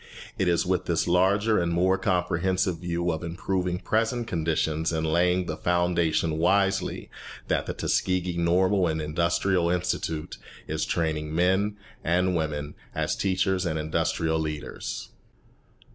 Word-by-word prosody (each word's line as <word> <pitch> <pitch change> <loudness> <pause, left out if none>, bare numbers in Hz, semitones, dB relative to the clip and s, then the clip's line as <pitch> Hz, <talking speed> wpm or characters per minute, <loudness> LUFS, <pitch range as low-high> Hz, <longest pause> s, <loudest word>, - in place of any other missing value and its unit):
It 95 - +2
is 85 -1 +2
with 90 0 0
this 85 0 0
larger 100 +5 +3
and 85 -1 0
more 90 +3 +3
comprehensive 90 0 0
view 85 0 -1
of 80 +1 -4
improving 90 +1 -2
present 115 +5 0
conditions 80 -4 0
and 80 -1 -1
laying 90 +3 +2
the 80 - -3
foundation 85 -2 +1
wisely 95 +3 +1 0.4
that - - 0
the - - -3
Tuskegee 90 -1 0
Normal 90 +2 +2
and 80 -1 -1
Industrial 85 +3 +1
Institute 85 -3 -2 0.3
is - - -1
training 80 -2 -1
men 95 +4 +2 0.3
and 90 +2 +2
women 75 -2 -2 0.2
as - - 0
teachers 95 -1 +1
and 80 -3 -1
industrial 80 +1 0
leaders. 75 -2 -5
85 Hz, 130 wpm, -26 LUFS, 80-95 Hz, 0.4 s, larger